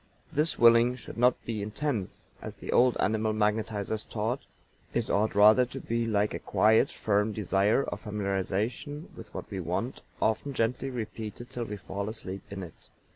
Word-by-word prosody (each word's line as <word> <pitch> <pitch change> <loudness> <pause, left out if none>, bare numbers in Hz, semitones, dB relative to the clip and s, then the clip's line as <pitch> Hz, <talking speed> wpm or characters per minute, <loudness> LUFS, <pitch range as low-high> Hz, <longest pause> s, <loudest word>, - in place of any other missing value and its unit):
This 155 +3 +2
willing 115 +1 +6
should 115 -1 -9
not 125 +1 +4
be 110 -3 -3
intense, 110 0 -3
as - - -7
the - - -6
old 125 0 +4
animal 110 +1 +1
magnetizers 105 0 0
taught; 115 +4 -1 0.6
it - - 0
ought 105 +1 +1
rather 105 +4 +7
to 130 +2 -7
be 115 -1 -1
like 105 -1 +1
a - - -3
quiet, 110 +1 +4
firm 105 +1 0
desire 105 +4 +2
or - - -5
familiarization 105 - -3
with - - -11
what - - -6
we - - -3
want, - - -3 0.2
often 110 +6 0
gently 125 +4 0
repeated 115 -1 -6
till 120 -1 -3
we 105 -1 -5
fall 100 +2 -4
asleep 100 -3 -5
in 100 -2 -6
it. 85 - -9
110 Hz, 170 wpm, -29 LUFS, 105-120 Hz, 0.6 s, rather